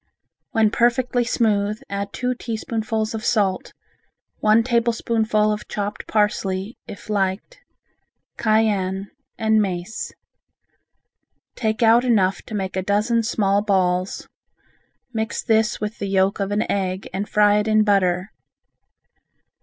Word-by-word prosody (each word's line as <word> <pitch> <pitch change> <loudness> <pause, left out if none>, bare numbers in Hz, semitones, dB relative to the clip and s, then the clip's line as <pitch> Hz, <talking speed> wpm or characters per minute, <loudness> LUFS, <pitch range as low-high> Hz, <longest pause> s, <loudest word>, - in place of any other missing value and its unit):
When 220 -2 +2
perfectly 245 +1 +2
smooth, 215 -2 0
add 200 0 -4
two 250 +3 -1
teaspoonfuls 225 -2 -3
of 220 -1 -5
salt, 200 -6 0 0.7
one 215 +2 +4
tablespoonful 230 -3 +1
of 210 - -7
chopped 205 0 -4
parsley 205 0 0
(if - - -10
liked), 200 - -2 0.8
cayenne 200 -3 0 0.3
and 220 -1 +3
mace. 185 +1 -4 1.4
Take 220 -1 -1
out 230 +2 +5
enough 195 -7 +2
to 220 - -5
make 190 -2 -3
a 190 - 0
dozen 210 +4 +1
small 205 -3 +1
balls, 185 -2 0 0.9
mix 220 0 -2
this 220 -2 +2
with 210 +2 -4
the 200 - -3
yolk 195 +1 +1
of 195 -1 -1
an 205 +2 +1
egg 190 -1 -2
and 200 +2 -3
fry 210 0 +4
it 210 - -2
in 215 0 +4
butter. 190 -2 +1
210 Hz, 120 wpm, -22 LUFS, 195-225 Hz, 1.4 s, out